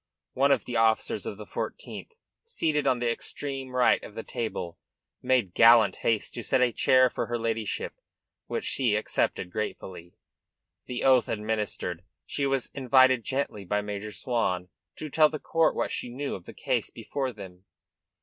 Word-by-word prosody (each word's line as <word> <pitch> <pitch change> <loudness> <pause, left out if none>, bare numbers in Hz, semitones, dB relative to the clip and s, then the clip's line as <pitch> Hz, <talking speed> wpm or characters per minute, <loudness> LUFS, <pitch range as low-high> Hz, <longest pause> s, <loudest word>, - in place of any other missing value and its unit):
One 140 +2 +3
of 140 - +2
the 120 - -2
officers 110 -1 +1
of - - -5
the - - -8
Fourteenth 460 - -6 0.3
seated 155 - 0
on 130 -2 +3
the 120 -1 0
extreme 135 +1 -5
right 125 - +4
of 105 - -10
the 115 - -5
table 110 -8 -4 0.4
made 120 -9 +1
gallant 115 -4 +6
haste 110 -2 0
to 120 - -4
set - - +2
a 125 -1 +3
chair 130 +2 +4
for - - -3
her 120 - -1
ladyship, 115 -2 -2 0.5
which - - -3
she 120 -6 +1
accepted 105 -3 -1
gratefully. 90 -4 -5 0.7
The 125 - -4
oath 130 -3 +4
administered, 105 -5 -2 0.2
she 140 -1 -1
was 135 -2 -1
invited 130 -2 +4
gently 130 -6 -2
by 105 +3 0
Major 105 +1 -5
Swan 100 -8 -1 0.3
to 155 - -6
tell 155 +1 +4
the 155 - -4
court 165 +2 +1
what - - -1
she 125 - -3
knew 135 +4 -4
of 90 - -7
the - - -11
case - - -1
before 135 -2 -4
them. 95 -4 -12
120 Hz, 170 wpm, -27 LUFS, 105-130 Hz, 0.7 s, gallant